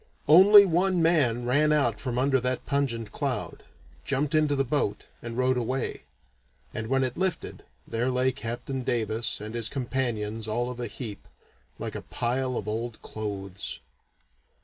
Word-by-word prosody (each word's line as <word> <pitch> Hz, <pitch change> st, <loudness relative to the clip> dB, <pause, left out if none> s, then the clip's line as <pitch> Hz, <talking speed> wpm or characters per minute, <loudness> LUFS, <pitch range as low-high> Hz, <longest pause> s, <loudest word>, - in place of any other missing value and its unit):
Only 200 Hz, +5 st, +9 dB
one 180 Hz, +1 st, +2 dB
man 130 Hz, -8 st, +2 dB
ran 145 Hz, +5 st, +3 dB
out 120 Hz, -8 st, +2 dB
from 125 Hz, -2 st, -3 dB
under 135 Hz, +1 st, +3 dB
that 125 Hz, 0 st, -1 dB
pungent 130 Hz, -6 st, -1 dB
cloud, -, -, -3 dB, 0.4 s
jumped 140 Hz, +2 st, 0 dB
into 155 Hz, -2 st, +3 dB
the 135 Hz, -, +2 dB
boat, 130 Hz, -6 st, -1 dB, 0.2 s
and 120 Hz, 0 st, -6 dB
rowed 130 Hz, 0 st, +2 dB
away; 130 Hz, +2 st, -2 dB, 0.7 s
and 115 Hz, -1 st, -4 dB
when 135 Hz, +2 st, +2 dB
it 130 Hz, -2 st, -2 dB
lifted, 185 Hz, -1 st, -2 dB, 0.2 s
there 120 Hz, +3 st, -1 dB
lay 130 Hz, +1 st, +2 dB
Captain 125 Hz, +1 st, -4 dB
Davis 115 Hz, -1 st, -1 dB
and 105 Hz, +1 st, -7 dB
his 115 Hz, -2 st, 0 dB
companions 115 Hz, -5 st, -2 dB
all 120 Hz, +3 st, -1 dB
of 125 Hz, -, -9 dB
a 120 Hz, -, -2 dB
heap, 105 Hz, -1 st, -7 dB, 0.5 s
like -, -, -4 dB
a -, -, -5 dB
pile 125 Hz, +1 st, -1 dB
of 105 Hz, -, -5 dB
old 115 Hz, +1 st, -3 dB
clothes. 100 Hz, -2 st, -5 dB
125 Hz, 155 wpm, -27 LUFS, 115-140 Hz, 0.7 s, Only